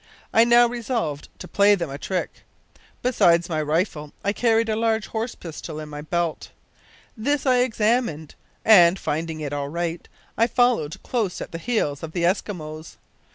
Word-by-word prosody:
I 225 Hz, +1 st, +6 dB
now 240 Hz, 0 st, +6 dB
resolved 230 Hz, -, -3 dB
to -, -, -9 dB
play 205 Hz, +1 st, +4 dB
them 170 Hz, -7 st, -4 dB
a 140 Hz, -, -6 dB
trick. 185 Hz, -2 st, -4 dB, 0.6 s
Besides 175 Hz, -9 st, +3 dB
my 155 Hz, -2 st, -1 dB
rifle 150 Hz, -1 st, -1 dB
I 200 Hz, -, +1 dB
carried 225 Hz, 0 st, +2 dB
a 220 Hz, -, 0 dB
large 225 Hz, -1 st, 0 dB
horse 225 Hz, +2 st, -4 dB
pistol 160 Hz, -2 st, -8 dB
in 155 Hz, -1 st, -7 dB
my 150 Hz, 0 st, -7 dB
belt. 170 Hz, +1 st, -2 dB, 0.7 s
This 280 Hz, +6 st, -1 dB
I 255 Hz, -2 st, +4 dB
examined, 220 Hz, -, 0 dB, 0.3 s
and, 180 Hz, -4 st, +7 dB
finding 160 Hz, -1 st, -3 dB
it 145 Hz, -1 st, -4 dB
all 140 Hz, -1 st, -3 dB
right, 170 Hz, +1 st, -4 dB, 0.3 s
I 230 Hz, -, +5 dB
followed 245 Hz, -11 st, +1 dB
close 220 Hz, -7 st, -2 dB
at -, -, -7 dB
the 165 Hz, -, -6 dB
heels 165 Hz, -, -1 dB
of 160 Hz, -1 st, -7 dB
the 175 Hz, -, -1 dB
Eskimos. 165 Hz, -4 st, -3 dB
180 Hz, 165 wpm, -23 LUFS, 155-230 Hz, 0.7 s, and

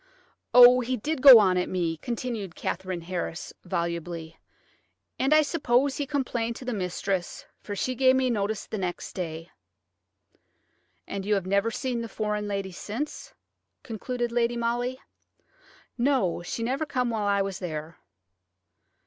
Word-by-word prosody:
Oh, 245 Hz, 0 st, +9 dB
he 255 Hz, +1 st, -1 dB
did 295 Hz, +5 st, -3 dB
go 265 Hz, -3 st, +12 dB
on 190 Hz, -4 st, +4 dB
at 180 Hz, -, -2 dB
me!" 170 Hz, -3 st, -1 dB
continued 225 Hz, -3 st, -4 dB
Katherine 185 Hz, -1 st, -3 dB
Harris, 175 Hz, 0 st, -5 dB
volubly. 170 Hz, -2 st, -4 dB, 0.8 s
"And 270 Hz, +2 st, +1 dB
I 310 Hz, 0 st, +6 dB
suppose 275 Hz, -3 st, +1 dB
he 285 Hz, -, -2 dB
complained 240 Hz, -5 st, -2 dB
to 255 Hz, -, -9 dB
the 250 Hz, -, -2 dB
mistress, 185 Hz, -1 st, -3 dB
for 205 Hz, -, -6 dB
she 255 Hz, +5 st, -1 dB
give 260 Hz, +1 st, +4 dB
me 260 Hz, -1 st, +2 dB
notice 210 Hz, -1 st, -2 dB
the 215 Hz, -, -5 dB
next 180 Hz, -2 st, -4 dB
day." 165 Hz, -2 st, -5 dB, 1.6 s
"And 200 Hz, -1 st, -4 dB
you 210 Hz, +1 st, +1 dB
have 195 Hz, -3 st, -2 dB
never 200 Hz, +3 st, +1 dB
seen 240 Hz, +1 st, -3 dB
the 230 Hz, -, -6 dB
foreign 210 Hz, -1 st, -2 dB
lady 195 Hz, -1 st, -3 dB
since?" 275 Hz, -, -6 dB, 0.5 s
concluded 240 Hz, +2 st, -3 dB
Lady 240 Hz, 0 st, +1 dB
Molly. 240 Hz, +2 st, -1 dB, 1.0 s
"No; 245 Hz, -10 st, +1 dB
she 200 Hz, +6 st, -4 dB
never 270 Hz, +6 st, -1 dB
come 250 Hz, -3 st, -1 dB
while 215 Hz, -2 st, -1 dB
I 200 Hz, -1 st, +2 dB
was 195 Hz, -2 st, -4 dB
there." 160 Hz, -2 st, -6 dB
220 Hz, 150 wpm, -27 LUFS, 185-250 Hz, 1.6 s, go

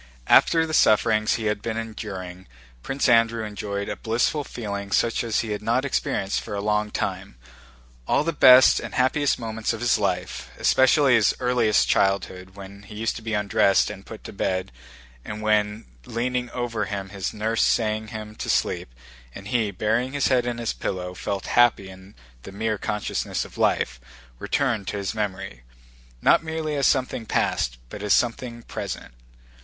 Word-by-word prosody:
After 165 Hz, -1 st, +5 dB
the 160 Hz, -, -6 dB
sufferings 110 Hz, -4 st, +3 dB
he 110 Hz, -, -4 dB
had 105 Hz, -1 st, -1 dB
been 115 Hz, 0 st, -3 dB
enduring, 95 Hz, -5 st, -7 dB, 0.3 s
Prince 135 Hz, -, -1 dB
Andrew 115 Hz, -1 st, +3 dB
enjoyed 100 Hz, -1 st, -4 dB
a -, -, -3 dB
blissful 120 Hz, +6 st, 0 dB
feeling 100 Hz, -5 st, -6 dB
such 115 Hz, +3 st, +1 dB
as 115 Hz, -2 st, 0 dB
he 115 Hz, -, -5 dB
had 105 Hz, -, -3 dB
not 120 Hz, +5 st, 0 dB
experienced 100 Hz, -7 st, -1 dB
for 105 Hz, -, -6 dB
a -, -, -2 dB
long 105 Hz, +1 st, 0 dB
time. -, -, -4 dB, 0.7 s
All -, -, +2 dB
the 165 Hz, +1 st, -1 dB
best 130 Hz, -3 st, +7 dB
and -, -, -7 dB
happiest 135 Hz, +3 st, +2 dB
moments 115 Hz, -1 st, -3 dB
of 115 Hz, -, -6 dB
his 120 Hz, -2 st, +2 dB
life—especially 125 Hz, -, +2 dB
his 115 Hz, -3 st, +4 dB
earliest 125 Hz, -4 st, +2 dB
childhood, 95 Hz, -1 st, 0 dB
when 100 Hz, 0 st, -11 dB
he 105 Hz, +1 st, -12 dB
used 115 Hz, +2 st, -2 dB
to -, -, -9 dB
be 110 Hz, -1 st, -3 dB
undressed 100 Hz, -1 st, +2 dB
and 95 Hz, -, -10 dB
put 110 Hz, +1 st, -11 dB
to -, -, -9 dB
bed, 95 Hz, -5 st, -2 dB, 0.5 s
and 105 Hz, 0 st, -6 dB
when 105 Hz, 0 st, +1 dB, 0.2 s
leaning 125 Hz, +1 st, -2 dB
over 120 Hz, -3 st, -3 dB
him 100 Hz, -1 st, -5 dB
his 95 Hz, -2 st, -4 dB
nurse 110 Hz, +1 st, -1 dB
sang 110 Hz, -1 st, +1 dB
him 110 Hz, 0 st, -7 dB
to -, -, -5 dB
sleep -, -, 0 dB, 0.4 s
and 100 Hz, +1 st, -9 dB
he, 115 Hz, -3 st, +1 dB
burying 110 Hz, +7 st, -1 dB
his 145 Hz, -1 st, +1 dB
head 125 Hz, -1 st, +2 dB
in 120 Hz, -1 st, -2 dB
the 115 Hz, -1 st, -2 dB
pillow, 90 Hz, -1 st, -3 dB
felt 95 Hz, +1 st, -4 dB
happy 120 Hz, -5 st, +3 dB
in 95 Hz, +1 st, -14 dB, 0.3 s
the 95 Hz, -, -10 dB
mere 110 Hz, +1 st, -2 dB
consciousness 105 Hz, -1 st, -2 dB
of -, -, -14 dB
life—returned 65 Hz, -, -2 dB
to -, -, -3 dB
his 100 Hz, 0 st, -3 dB
memory, 95 Hz, -, -4 dB, 0.6 s
not -, -, +5 dB
merely 160 Hz, -1 st, -3 dB
as 140 Hz, -1 st, +2 dB
something 125 Hz, -4 st, 0 dB
past -, -, 0 dB
but 105 Hz, -, -8 dB
as 105 Hz, -1 st, +3 dB
something 120 Hz, 0 st, -2 dB
present. -, -, -6 dB
110 Hz, 170 wpm, -24 LUFS, 100-120 Hz, 0.7 s, best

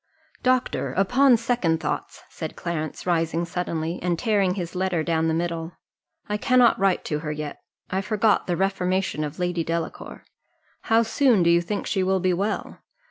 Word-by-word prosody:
"Doctor, 255 Hz, -1 st, +1 dB
upon 245 Hz, +6 st, +4 dB
second 225 Hz, -9 st, 0 dB
thoughts," 155 Hz, -2 st, -4 dB
said 160 Hz, -, -7 dB
Clarence, 160 Hz, -3 st, -4 dB
rising 165 Hz, -1 st, 0 dB
suddenly, 170 Hz, -1 st, -3 dB
and 175 Hz, -1 st, 0 dB
tearing 200 Hz, -3 st, +1 dB
his 175 Hz, -4 st, -4 dB
letter 185 Hz, -3 st, 0 dB
down 160 Hz, 0 st, +1 dB
the 160 Hz, -, +1 dB
middle, 165 Hz, 0 st, -3 dB, 0.5 s
"I 210 Hz, -, -1 dB
cannot 250 Hz, +1 st, +4 dB
write 195 Hz, -1 st, +1 dB
to 150 Hz, -, -2 dB
her 150 Hz, 0 st, -4 dB
yet 150 Hz, -1 st, -5 dB, 0.3 s
I 190 Hz, -, 0 dB
forgot 210 Hz, +1 st, +1 dB
the 175 Hz, -2 st, 0 dB
reformation 185 Hz, -4 st, 0 dB
of 150 Hz, -1 st, -5 dB
Lady 175 Hz, -2 st, -1 dB
Delacour: 165 Hz, 0 st, -5 dB, 0.6 s
how 225 Hz, 0 st, +4 dB
soon 230 Hz, -3 st, +3 dB
do 170 Hz, -, +4 dB
you 170 Hz, 0 st, +4 dB
think 200 Hz, +4 st, -3 dB
she 195 Hz, -, 0 dB
will 190 Hz, +1 st, +2 dB
be 185 Hz, 0 st, +1 dB
well? 200 Hz, +5 st, -2 dB
180 Hz, 170 wpm, -24 LUFS, 165-205 Hz, 0.6 s, upon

